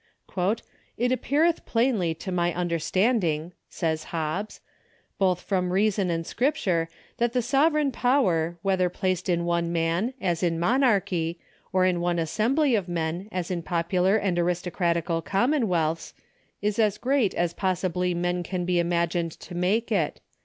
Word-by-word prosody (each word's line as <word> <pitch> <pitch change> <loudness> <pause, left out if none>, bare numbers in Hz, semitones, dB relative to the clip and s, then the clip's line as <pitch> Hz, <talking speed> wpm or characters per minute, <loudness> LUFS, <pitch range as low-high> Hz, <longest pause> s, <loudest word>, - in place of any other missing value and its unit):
" 230 - -15
It 245 +1 +1
appeareth 295 +7 +1
plainly 225 -9 +1
to 185 - -6
my 175 -1 +1
understanding," 175 0 0 0.2
says 160 -3 -2
Hobbes,' 165 +6 -3 0.3
" - - -38
both 185 -2 +2
from 180 -2 -1
reason 195 0 +2
and 165 -1 -1
Scripture, 185 - 0 0.3
that 240 -1 +1
the 250 - +2
sovereign 290 +3 +2
power, 185 - +1
whether 190 -2 +2
placed 185 0 -2
in 170 -1 +1
one 170 0 0
man, 170 +9 0
as 175 -5 -1
in 165 -2 +1
monarchy, 185 -7 +1 0.3
or 185 0 +3
in 180 -1 +2
one 175 0 0
assembly 240 - +1
of 195 -5 0
men, 170 +3 -2
as 180 -1 -3
in 175 -2 -1
popular 180 +4 +1
and 190 -4 0
aristocratical 170 -1 0
commonwealths, 190 - 0 0.5
is 210 +1 0
as 210 -2 +3
great 255 -4 +1
as 170 -1 0
possibly 180 -1 -1
men 175 +1 0
can 180 0 -3
be 180 -1 +2
imagined 170 -1 0
to 175 - -12
make 200 +7 0
it. 175 -8 0
180 Hz, 150 wpm, -26 LUFS, 170-215 Hz, 0.5 s, or